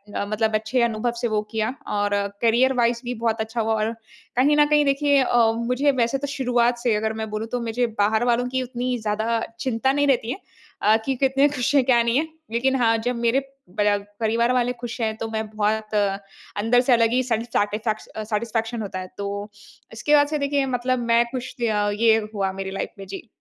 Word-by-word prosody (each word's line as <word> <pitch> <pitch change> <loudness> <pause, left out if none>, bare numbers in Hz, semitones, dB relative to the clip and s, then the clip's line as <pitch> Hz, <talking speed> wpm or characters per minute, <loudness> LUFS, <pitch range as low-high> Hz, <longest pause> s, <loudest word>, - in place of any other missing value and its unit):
अ, - - -1
मतलब 215 +1 0
अच्छे 220 +4 0
अनुभव 225 +2 -1
से 240 - +1
वो 210 - +2
किया 220 +2 -1 0.2
और 205 0 +1 0.3
करियर 240 +3 +3
वाइस 235 0 +1
भी 245 - -2
बहुत 225 -1 +1
अच्छा 225 +1 -2
हुआ। 220 0 0
और 220 - 0 0.5
कहीं 290 +4 +4
न 295 - +6
कहीं 295 -1 +4
देखिए 280 0 +3
अ, 235 -2 +3
मुझे 250 +5 +1
वैसे 235 +4 0
तो 285 +1 -4
शुरुआत 245 -2 +1
से 240 -2 +1
अगर 220 +1 -1
मैं 220 - -4
बोलूँ 215 +1 -4
तो - - -1
मुझे 240 +2 0 0.2
बाहर 220 +3 +2
वलों 245 +1 0
की 260 0 -1
उतनी 250 0 -3
ज़्यादा 220 +2 0 0.2
चिंता 260 +1 0
नहीं 285 0 +2
रहती 245 -4 +1
है, 380 - -5 0.4
अ, 215 +1 +5
कि 270 - 0
कितने 270 +2 +4
खुश 290 +1 -1
है 275 - +5
क्या 245 -2 +4
नहीं 235 +2 +1
है। 320 - -2 0.2
लेकिन 260 +3 +1
हाँ, 230 -3 +3
जब 245 +2 -2
मेरे 245 +4 +3 0.4
पर 205 0 +3 0.2
परिवार 230 +2 +1
वाले 250 0 +1
खुश 240 0 -6
हैं 220 -1 0
तो 225 - -4
मैं 220 0 -3
बहुत 215 0 -1 0.7
अंदर 245 +3 +4
से 255 0 +3
अलग 230 -1 +3
ही 255 - +2
सैटिस्फैक 230 -3 0
ए, - - 0
फैक्स 220 -1 -3
अ, 215 - -7
सैटिस्फैक्शन 225 +2 -2
होता 190 -3 -5
है। 185 - -6
तो 200 - -3 0.7
इसके 295 +7 +2
बाद 290 0 +5
से 300 +1 -2
देखिए 280 -1 +1
मतलब 250 +1 0
मैं 235 0 +5
ख़ुश 255 -1 -5
या 210 -3 +1
ये 225 -1 +5 0.2
हुआ 195 -2 -1
मेरी 190 - -4
लाइफ 195 - -3
में 195 - -7
जी। 195 +5 -8
235 Hz, 220 wpm, -23 LUFS, 220-255 Hz, 0.7 s, न